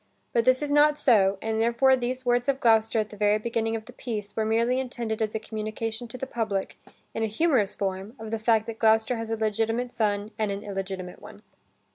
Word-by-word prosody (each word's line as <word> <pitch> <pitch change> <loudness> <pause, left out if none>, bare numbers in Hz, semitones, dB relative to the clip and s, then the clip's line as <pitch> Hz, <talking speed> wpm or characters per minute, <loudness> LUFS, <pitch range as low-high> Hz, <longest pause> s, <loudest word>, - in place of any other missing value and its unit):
But 230 -1 +2
this 255 +2 +4
is 290 - -2
not 295 0 +5
so, 205 -9 +4
and 220 0 0
therefore 235 +3 +4
these 255 +1 -3
words 245 +2 +2
of 270 -1 +1
Gloucester 225 -2 +3
at 215 -1 -1
the - - -9
very 210 0 +3
beginning 225 0 -1
of 220 -1 -5
the - - -13
piece, 210 -4 -5
were 220 - 0
merely 230 +3 +2
intended 235 -4 -4
as 215 -1 -1
a - - 0
communication 220 +2 -5
to 230 - -8
the 265 - -4
public 220 -6 -3 0.3
in - - -3
a 220 - +1
humorous 225 - +1
form 195 +3 -4
of 220 -2 -8
the 225 - -1
fact 220 0 +2
that 225 -1 -7
Gloucester 220 +2 +3
has 225 0 -5
a 225 - -1
legitimate 225 +3 -1
son 210 -2 -1
and 215 -1 +1
an 200 +1 -5
illegitimate 190 -2 -5
one. - - -13
225 Hz, 220 wpm, -26 LUFS, 215-240 Hz, 0.3 s, not